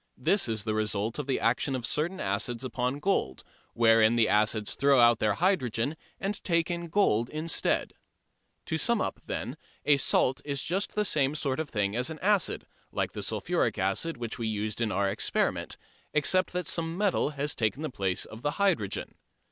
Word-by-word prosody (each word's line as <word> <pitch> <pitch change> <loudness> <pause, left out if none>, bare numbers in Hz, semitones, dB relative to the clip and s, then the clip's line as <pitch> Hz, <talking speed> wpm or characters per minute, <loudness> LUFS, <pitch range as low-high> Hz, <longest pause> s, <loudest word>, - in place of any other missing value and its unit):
This 160 - +2
is 110 -2 -1
the 110 0 -1
result 105 +2 -1
of 145 - -4
the 135 - 0
action 125 +4 +1
of 125 -3 -3
certain 165 +9 -1
acids 115 +5 -2
upon 125 +1 -2
gold, 145 - -1 0.3
wherein 115 -1 +5
the 115 -2 +4
acids 105 0 +2
throw 140 -1 +4
out 120 -1 +6
their 105 -1 +2
hydrogen 145 - 0 0.2
and 200 +1 -2
take 170 -1 +1
in 170 0 -3
gold 140 - +2
instead. 155 +1 -1 0.7
To 160 - -2
sum 235 +6 +2
up, - - -2
then, - - -4 0.3
a 145 -1 +5
salt 130 -1 +2
is 140 -1 -2
just 190 +4 -2
the 210 0 +1
same 145 -5 +2
sort 140 -2 -1
of 160 -2 -3
thing 100 -1 -1
as 125 +2 +1
an 160 - -6
acid, 200 0 +2 0.3
like - - -1
the - - -6
sulphuric - - -1
acid 100 - -1
which 120 0 -5
we 115 - -1
used 110 +1 -3
in 110 -2 0
our 100 0 +1
"experiment," 100 +2 -1 0.4
except 185 +5 +2
that 180 0 -2
some 165 0 -1
metal 200 -6 +1
has 145 +1 0
taken 115 +7 -1
the 155 - -3
place 95 -5 -1
of 110 - -11
the 145 - 0
hydrogen. 185 - 0
130 Hz, 190 wpm, -28 LUFS, 110-165 Hz, 0.7 s, out